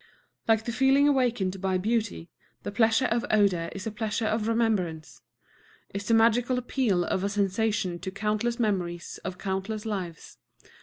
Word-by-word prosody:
Like 220 -1 +3
the 235 - -2
feeling 270 +4 +4
awakened 235 -9 +1
by 190 -1 +1
beauty, 210 -3 -2 0.3
the - - -4
pleasure 225 +4 +3
of 235 -1 +1
odor 195 -6 +2
is 195 -2 -7
a 220 - -2
pleasure 220 +1 -2
of 215 0 0
remembrance, 205 -9 -1 0.7
is 200 0 -4
the 230 - +4
magical 235 +3 +3
appeal 245 -7 +1
of 190 - -1
a 200 - 0
sensation 200 -2 0
to 190 - -5
countless 215 +4 -1
memories 180 -6 -2
of 180 - -5
countless 195 +3 -3
lives. 185 - -5
210 Hz, 155 wpm, -27 LUFS, 190-230 Hz, 0.7 s, feeling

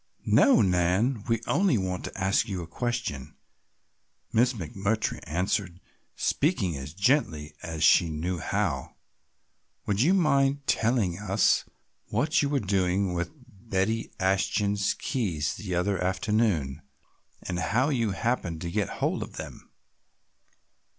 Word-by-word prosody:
"No, 275 - +5
Nan, 95 +6 +1
we 115 -2 +1
only 185 - +2
want 95 -2 -3
to - - -7
ask 95 +4 +2
you 95 -3 -3
a - - -9
question," 85 - -3 1.0
Miss 125 +3 +3
McMurtry 100 +2 -2
answered, 90 +2 -1 0.4
speaking 125 - 0
as 70 +3 -7
gently 95 - +1
as 80 -1 -4
she 85 +2 +5
knew 85 +3 -3
how. - - -2 0.9
"Would 100 +1 0
you 175 +9 +4
mind 140 -5 +2
telling 110 -7 +1
us 100 0 +2 0.4
what 125 +9 +1
you 140 - 0
were 140 -1 +1
doing 95 -2 0
with 85 -1 -2 0.4
Betty 105 +4 0
Ashton's 100 +1 +1
keys 85 - -2
the 95 -4 -4
other 95 +1 0
afternoon 95 - 0 0.6
and 90 -1 -3
how 125 +9 +1
you 120 -6 +1
happened 95 -7 -1
to 85 - -4
get 105 +1 0
hold - - +1
of - - -6
them?" - - -9
100 Hz, 130 wpm, -27 LUFS, 90-115 Hz, 1.0 s, No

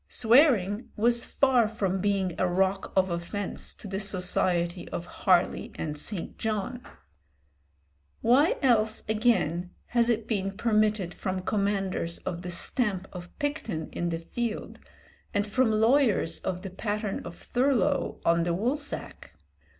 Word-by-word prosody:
Swearing 230 - +4
was 235 +2 +3
far 255 -5 +3
from 195 -4 -1
being 195 -3 +1
a 185 - +3
rock 190 +2 0
of 185 -1 +3
offence 170 +4 -4
to - - -10
the 195 0 -3
society 180 -3 0
of 170 - -4
Harley 180 0 +1
and 150 -2 -4
St. 170 +4 -5
John. 220 +3 -2 1.4
Why 265 +7 +4
else, 220 -4 +2
again, 210 -6 +1 0.2
has 235 -1 +2
it 230 -1 0
been 195 -3 -2
permitted 215 -5 +1
from 185 -1 -3
commanders 195 -4 -1
of 175 -2 -5
the 180 - -6
stamp 190 +1 0
of 175 -1 -10
Picton 260 - -3
in 175 - -2
the 165 - -1
field, 225 +7 -4 0.6
and 205 0 +2
from 230 +3 +2
lawyers 220 - +3
of 180 0 -4
the 195 - -6
pattern 210 +1 -3
of 170 - -8
Thurlow 270 +4 0
on 170 0 +4
the 170 0 0
woolsack? 275 - -3
205 Hz, 135 wpm, -28 LUFS, 180-235 Hz, 1.4 s, Swearing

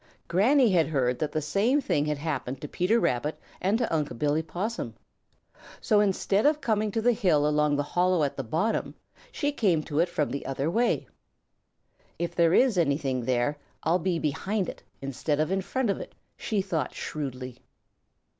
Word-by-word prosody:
Granny 235 +6 +4
had 170 -4 +3
heard 130 -5 0
that 150 -1 -1
the 155 0 -2
same 230 - +2
thing 150 - 0
had 150 -1 -1
happened 140 -4 -3
to 150 - -6
Peter 190 +10 +1
Rabbit 150 - -1 0.2
and 195 +4 +2
to 235 -7 -1
Unc' 145 -6 -2
Billy 150 +4 +1
Possum. 200 +8 -4 0.8
So 215 -3 +3
instead 200 0 +2
of 300 0 +2
coming 215 -5 0
to 220 +2 -2
the 245 - +5
hill 175 -10 +2
along 150 -1 +2
the 145 - 0
hollow 180 +2 +1
at 140 - -1
the 135 - -3
bottom, 165 - -1 0.4
she 290 -9 -1
came 185 - +1
to 150 0 -2
it 170 +1 +3
from 150 -7 -1
the 140 - -4
other 135 +4 -1
way. 235 +5 +1 1.1
"If 170 0 -3
there 170 0 +3
is 245 -8 +4
anything 140 -5 0
there, 130 +3 0 0.2
I'll 170 +3 +2
be 180 0 0
behind 185 +6 -1
it - - -9 0.2
instead 140 +2 -2
of 155 +3 +1
in 190 0 +1
front 245 +3 -1
of - - -3
it," - - -9 0.2
she 205 -3 -1
thought 165 -8 -2
shrewdly. 130 -4 -5
165 Hz, 185 wpm, -27 LUFS, 145-205 Hz, 1.1 s, the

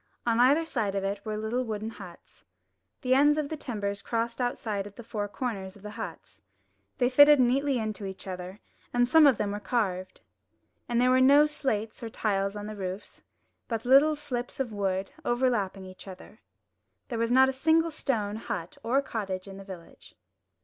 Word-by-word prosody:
On 230 -1 +2
either 280 +7 +5
side 220 -10 -2
of 195 - -1
it 200 +1 -3
were 215 -1 -3
little 220 +4 -1
wooden 220 -1 -4
huts. 180 -6 -13 0.6
The 255 - +3
ends 290 +3 +5
of 300 -2 -1
the 315 - -3
timbers 205 -8 -4
crossed 230 +3 -2
outside 215 -5 -2
at 205 - -14
the 235 - -10
four 210 -2 -3
corners 200 -4 -5
of 200 - -17
the 210 - -7
huts. 160 - -8 0.6
They 245 - +3
fitted 290 +3 +7
neatly 265 +2 +2
into 215 -3 -3
each 190 0 -9
other, 185 +1 -7 0.3
and 245 0 +2
some 310 +3 +7
of 265 -6 +4
them 205 -1 -1
were 205 - -3
carved. 195 -4 -2 0.7
And 240 0 +1
there 250 +1 +4
were 255 0 +4
no 285 +3 +7
slates 260 -7 -2
or 230 - -5
tiles 200 -2 -1
on 205 0 -6
the 215 0 -6
roofs, 190 0 -6 0.4
but 230 -1 -3
little 280 +5 +6
thin 295 - -16
slips 250 -4 -4
of 245 -5 -2
wood 195 -1 -2
over 250 0 +2
lapping 195 -4 -2
each 185 +1 -12
other. 190 +3 -12 0.7
There 235 -3 -3
was 230 +1 0
not 260 +1 +6
a 265 - -1
single 320 +4 +2
stone 220 -9 -2
hut 170 -6 -6
or 260 +5 +1
cottage 195 -6 -4
in 195 0 -9
the 195 - -9
village. 185 -4 -12
225 Hz, 195 wpm, -28 LUFS, 200-255 Hz, 0.7 s, fitted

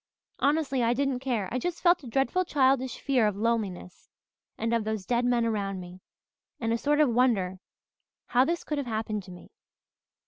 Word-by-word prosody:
Honestly, 280 -2 +1
I 235 +1 +2
didn't 275 -1 0
care. 245 -7 -1
I 255 - -1
just 345 +6 -3
felt 350 -1 +4
a - - -9
dreadful 275 +10 +1
childish 265 -5 +1
fear 255 -6 +2
of 210 - -1
loneliness 205 -5 -3 0.5
and 230 +1 -1
of 230 -1 +1
those 215 -3 -3
dead 245 +2 +1
men 240 -1 +2
around 200 -4 -2
me, 180 +1 -10 0.6
and 225 -1 0
a - - +1
sort 295 +3 +1
of 290 -6 +4
wonder 205 -7 +2 0.7
how 250 +1 +3
this 335 +5 -1
could 300 -2 -2
have 275 - -4
happened 220 -2 -2
to 185 - -11
me. 180 - -13
240 Hz, 185 wpm, -28 LUFS, 215-275 Hz, 0.7 s, felt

